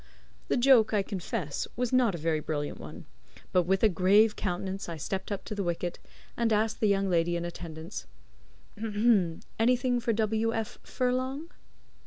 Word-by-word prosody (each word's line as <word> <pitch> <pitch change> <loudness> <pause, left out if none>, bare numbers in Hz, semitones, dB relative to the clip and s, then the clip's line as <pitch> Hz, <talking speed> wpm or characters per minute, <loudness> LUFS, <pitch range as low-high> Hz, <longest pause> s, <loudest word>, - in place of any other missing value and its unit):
The - - +1
joke 240 -4 +5
I 200 - +2
confess 185 -5 -3
was 250 +1 -1
not 245 -7 +4
a - - -4
very 160 0 0
brilliant 150 -1 -3
one; - - -9 0.5
but 180 -2 +2
with 190 +2 +2
a - - +8
grave 205 +4 +4
countenance 190 0 -3
I 165 - -5
stepped 190 +7 -4
up 200 - -4
to - - -5
the 205 - -2
wicket 175 -1 -2 0.4
and 235 -1 +1
asked 215 +1 +1
the 215 - +3
young 195 -1 +2
lady 170 -1 +2
in 170 0 -2
attendance: 160 - -7 1.5
"Anything 245 +1 +3
for 235 -1 0
W. 220 +1 +1
F. 225 -1 -4
Furlong?" 260 +5 -2
200 Hz, 165 wpm, -29 LUFS, 175-230 Hz, 1.5 s, a